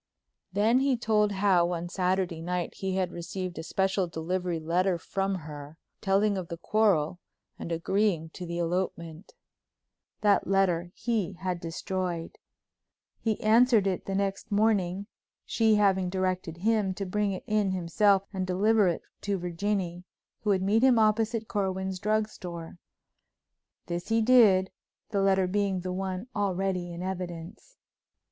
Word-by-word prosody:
Then 215 +6 +3
he 270 -2 +2
told 215 -2 +2
how 185 -3 +3
on 170 0 -3
Saturday 180 -2 -1
night 180 +1 -2
he 190 -1 -3
had 185 -2 0
received 175 +1 -5
a - - -5
special 190 +2 0
delivery 170 +1 -2
letter 175 +3 +1
from 195 +3 -2
her, 150 0 -9 0.2
telling 200 0 +2
of 180 - -6
the 170 0 -6
quarrel 180 -4 +1 0.4
and 170 - -6
agreeing 170 0 0
to 175 +2 -8
the 170 0 -4
elopement. 170 0 -3 0.9
That 205 -1 +3
letter 180 -3 +1
he 225 -7 -1
had 180 -1 -3
destroyed. 170 0 -4 0.8
He 220 -2 -1
answered 225 -1 +5
it 190 -2 -2
the 195 - -2
next 195 0 -2
morning, 200 -3 +1 0.4
she 220 -2 +3
having 190 -3 +3
directed 185 -3 -2
him 205 -1 +1
to 195 - -4
bring 205 +2 0
it 185 - -6
in 210 -2 +1
himself 190 +2 +2
and 185 -1 -2
deliver 205 +3 +3
it 170 - -1 0.2
to 200 -1 -1
Virginie, 180 0 -2 0.4
who 210 - -3
would 190 -2 +2
meet 210 +4 +3
him 260 -2 +5
opposite 220 +1 +2
Corwin's 190 -1 -2
drugstore. 190 -5 -3 1.1
This 175 0 -4
he 225 0 +3
did, 215 -6 +5 0.4
the 200 -3 +1
letter 195 -1 +3
being 195 0 0
the 185 0 -4
one 190 +1 -3
already 190 -3 -1
in 170 +1 -6
evidence. 180 - -6
190 Hz, 145 wpm, -28 LUFS, 175-205 Hz, 1.1 s, answered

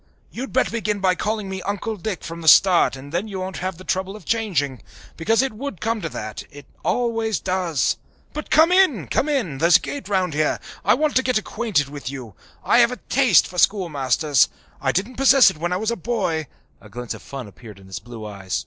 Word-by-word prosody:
"You'd 260 +3 -6
better 260 - +1
begin 215 -3 -1
by 190 -1 +3
calling 210 +2 -2
me 190 0 -5
Uncle 205 +3 -3
Dick 205 -1 -5
from 165 0 -7
the 160 - -6
start 175 -3 +6
and 135 +2 -11
then 175 +6 -2
you 195 -3 -5
won't 185 -1 -5
have 185 -1 -4
the 185 - -11
trouble 190 +1 -2
of 210 -6 -12
changing. 165 - -1 0.3
Because 225 +9 +2
it 270 - -2
would 235 - -6
come 225 +2 -1
to 165 - -3
that 110 -6 -6
it 145 -1 -13 0.2
always 225 -3 0
does. 180 -5 0 0.4
But 305 - -6
come 320 +3 +5
in, 360 - +4
come 300 - 0
in! 195 - -1
There's 170 +2 +6
a - - -10
gate 285 -6 -6
round 185 -5 0
here. 155 0 0 0.2
I 205 +6 +4
want 300 +2 0
to - - +4
get 255 -2 +1
acquainted 215 -8 -1
with 140 -2 -7
you. 130 -6 -8 0.3
I 235 - +4
have 235 0 +5
a 250 - -5
taste 255 -8 +5
for 180 - -5
schoolmasters. 150 - +2 0.3
I 135 - +1
didn't 200 - -2
possess 270 -1 +6
it - - -13
when 175 +2 -2
I 180 - +1
was 220 +4 -1
a - - -1
boy" 170 - -2 0.3
(a - - -15
glint 120 0 -6
of - - -11
fun 135 -4 -8
appeared 105 +1 -13
in 95 - -16
his 95 -1 -7
blue 115 -3 -10
eyes). 95 -8 -4
185 Hz, 225 wpm, -22 LUFS, 145-225 Hz, 0.4 s, start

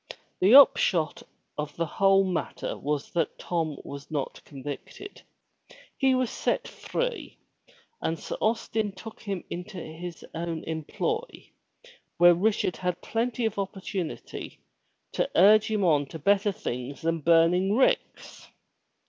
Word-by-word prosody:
The 200 +7 +6
upshot 175 - +5 0.4
of 150 -1 -4
the 170 - -1
whole 195 +4 +4
matter 185 -3 -3
was 145 0 -3
that 165 -3 -1
Tom 160 -4 -2
was 140 +1 -8
not 145 -4 -4
convicted. 145 - -8 0.7
He 265 -1 +3
was 255 -2 0
set - - -1
free - - -4 0.6
and 165 - -1
Sir - - -6
Austin 220 -2 0
took 220 +4 -11
him 195 -4 -4
into 180 +3 -6
his 170 +1 -8
own 165 -1 -4
employ 450 - -4 0.7
where 175 0 +8
Richard 195 0 0
had 180 -1 -2
plenty 235 +1 -1
of 220 -2 -1
opportunity 195 -3 -5 0.5
to - - -1
urge 210 +4 +6
him 215 -2 0
on 145 -4 +3
to 160 - -8
better 200 +6 +2
things 125 -4 -5
than 165 0 0
burning 170 +5 +4
ricks. 260 - 0
180 Hz, 130 wpm, -27 LUFS, 160-215 Hz, 0.7 s, where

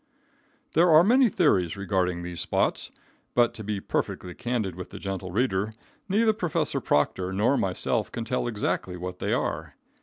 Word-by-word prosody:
There 170 +3 +5
are 160 +1 +8
many 245 +5 +5
theories 95 - +2
regarding 90 -3 -1
these 90 -1 -5
spots, - - 0 0.5
but, 120 -1 +4
to 110 -2 -8
be 105 -1 -2
perfectly 90 -2 -3
candid 120 -6 -2
with 90 +1 -8
the - - -9
gentle 95 -1 -4
reader, 105 0 0 0.3
neither 220 +3 +3
Prof. 175 -7 -1
Proctor 90 +5 +1
nor 105 +8 +2
myself 95 -8 0
can 115 - -4
tell 125 0 -1
exactly 105 -5 -2
what 90 +1 -6
they - - -1
are. - - -2
105 Hz, 160 wpm, -26 LUFS, 90-130 Hz, 0.5 s, are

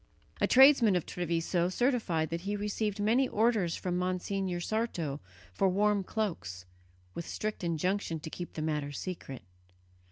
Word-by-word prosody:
A - - +4
tradesman 260 -6 +7
of 175 - 0
Treviso 170 0 -1
certified 185 - 0
that 170 0 -2
he 200 +3 -2
received 210 0 -2
many 235 +6 +3
orders 215 -6 +2
from 180 -1 -2
Monsignor 185 0 -1
Sarto 175 -8 -2 0.3
for 195 - +2
warm 205 +1 +2
cloaks, 165 - -3 0.5
with 170 - -6
strict 215 -2 -4
injunction 170 +1 -1
to 160 -1 -7
keep 175 - -7
the 155 - -4
matter 150 -2 -1
secret. 145 -4 -6
185 Hz, 140 wpm, -31 LUFS, 165-210 Hz, 0.5 s, tradesman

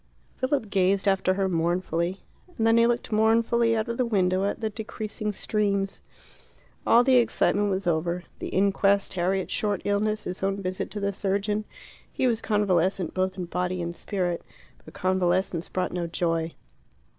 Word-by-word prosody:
Philip 260 -5 -1
gazed 195 +1 +2
after 190 -1 +2
her 195 0 +1
mournfully, 175 +1 -1 0.4
and 225 - +1
then 225 0 +5
he 230 0 +5
looked 240 -1 -1
mournfully 230 +1 +3
out 220 +1 -1
of 235 0 -3
the 255 - +2
window 190 -3 +2
at 200 - -2
the 220 -1 -2
decreasing 215 0 -4
streams. 200 -1 -1 0.9
All 240 - +6
the 260 0 +5
excitement 205 -3 +2
was 190 0 -1
over 170 +1 0 0.2
the - - -4
inquest, 195 +1 +2
Harriet's 190 +1 -1
short 205 -3 -1
illness, 210 +1 0
his 180 - -5
own 195 +1 0
visit 185 -1 -3
to 210 - -6
the 200 0 -1
surgeon. 205 +2 -1 0.5
He - - -1
was 230 -3 +1
convalescent, 190 -4 +1
both 185 0 -1
in 180 - -3
body 180 +1 -2
and 170 0 -4
spirit, 180 -4 -2 0.4
but 155 - -14
convalescence 185 -2 0
brought 185 -1 -1
no 175 -1 -2
joy. 165 0 -1
195 Hz, 165 wpm, -26 LUFS, 180-215 Hz, 0.9 s, All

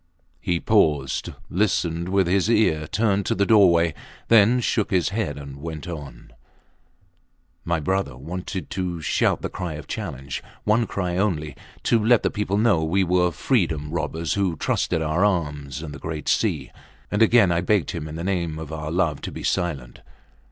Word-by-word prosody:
He 85 -1 -1
paused, 75 - +2 0.2
listened 85 -3 0
with 95 0 +3
his 95 +4 +1
ear 80 -10 +2
turned 100 -1 +1
to - - +1
the 100 - +2
doorway, 85 -7 +5 0.4
then 115 +2 +6
shook 110 -3 0
his 90 -3 +2
head 100 -8 -2
and 70 -1 -8
went 80 -1 -6
on: 75 -5 -8 1.3
My 85 -1 0
brother 95 -4 -1
wanted 90 +6 -6
to 90 -2 -3
shout - - +1
the - - 0
cry 90 -4 -5
of 75 - -8
challenge 70 - -5 0.2
one 110 +2 +2
cry 90 -2 -2
only 85 -7 -1 0.3
to 115 -2 +2
let 120 +1 +4
the - - +1
people 100 -1 -1
know 105 -7 +3
we 95 +5 +2
were 90 0 +2
freeborn 80 - 0
robbers 85 -1 -2
who 95 -4 0
trusted 80 +1 0
our 80 +5 +1
arms 75 -7 -1
and 75 -2 -7
the 70 - -9
great 80 -1 -5
sea. - - 0 0.4
And 105 - 0
again 115 -4 +5
I 85 0 +1
begged 100 0 +1
him 80 -3 -5
in 75 - -7
the 85 - -5
name 85 -4 -1
of 80 -1 -7
our 75 -1 -4
love 80 -4 0
to - - -5
be - - -8
silent. 70 -9 -2
85 Hz, 175 wpm, -23 LUFS, 75-100 Hz, 1.3 s, then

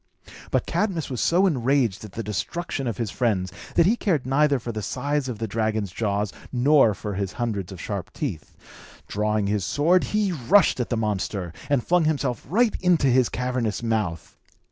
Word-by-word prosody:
But - - +1
Cadmus 180 -9 -1
was 125 - -2
so 180 +3 +3
enraged 130 - +1
at 105 -4 -10
the 115 - -4
destruction 135 - -3
of 115 - -3
his 110 -4 -2
friends, 95 -7 0 0.2
that 170 - +5
he 215 +6 +4
cared 170 - 0
neither 140 +2 +3
for 120 -1 -5
the 110 -1 -4
size 140 +5 -2
of 120 - -4
the 115 - -3
dragon's 110 -2 -1
jaws 105 0 -1 0.2
nor 130 -3 +4
for 105 0 -5
his 95 -1 -3
hundreds 105 -7 -3
of 95 - -9
sharp 100 -1 -5
teeth. 80 - -5 0.5
Drawing 105 0 0
his 100 -1 0
sword, 165 - +2
he 210 -2 0
rushed 170 - +3
at 125 - -1
the 120 - 0
monster, 100 -5 -2 0.2
and 140 -4 +1
flung 175 -2 +3
himself 140 -5 -1
right 225 +6 +3
into 180 -5 +3
his 130 -2 +4
cavernous 125 -4 -2
mouth. 105 -8 -2
120 Hz, 185 wpm, -24 LUFS, 105-145 Hz, 0.5 s, that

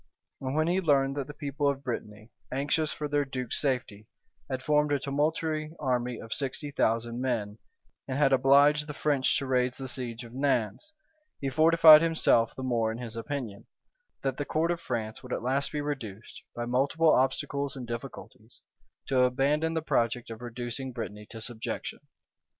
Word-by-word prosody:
And 130 +1 -3
when 155 0 +3
he 180 +3 +1
learned 135 -4 +2
that 140 -2 -2
the 145 - -8
people 145 -1 -1
of 140 -1 -3
Brittany, 110 -3 -6 0.2
anxious 150 +4 0
for 150 - -4
their 145 0 +1
duke's 130 -3 -3
safety, 125 -7 -2 0.4
had 130 0 -3
formed 150 0 +2
a 145 - +3
tumultuary 155 +3 -1
army 125 -3 -1
of 115 - -5
sixty 145 +1 -4
thousand 115 -1 0
men, 110 -5 -2 0.5
and 130 - -2
had 140 -2 +4
obliged 145 +3 +5
the 150 - -6
French 145 -3 +1
to 140 - -3
raise 125 -1 +1
the 135 - -5
siege 125 -2 -5
of 115 0 -12
Nantz, 135 - -1 0.5
he 135 - -2
fortified 155 +1 +8
himself 160 -8 +3
the 130 - -6
more 115 -3 +1
in 110 - -5
his 120 -2 -6
opinion, 115 -4 -5 0.6
that 135 -1 -1
the 145 - -1
court 160 +3 0
of 170 -1 -3
France 110 -6 -4
would 125 -1 -6
at - - -3
last 135 +3 0
be 150 - -2
reduced, 120 -8 -6
by 120 - -3
multiplied 140 +5 +3
obstacles 140 +1 -1
and 130 -2 -6
difficulties, 120 -1 -9 0.4
to 135 -2 +1
abandon 140 +6 +2
the 160 - -1
project 120 -4 0
of 115 +1 -8
reducing 120 +2 -5
Brittany 105 -3 -6
to 115 - -8
subjection. 115 0 -5
135 Hz, 175 wpm, -29 LUFS, 120-145 Hz, 0.6 s, fortified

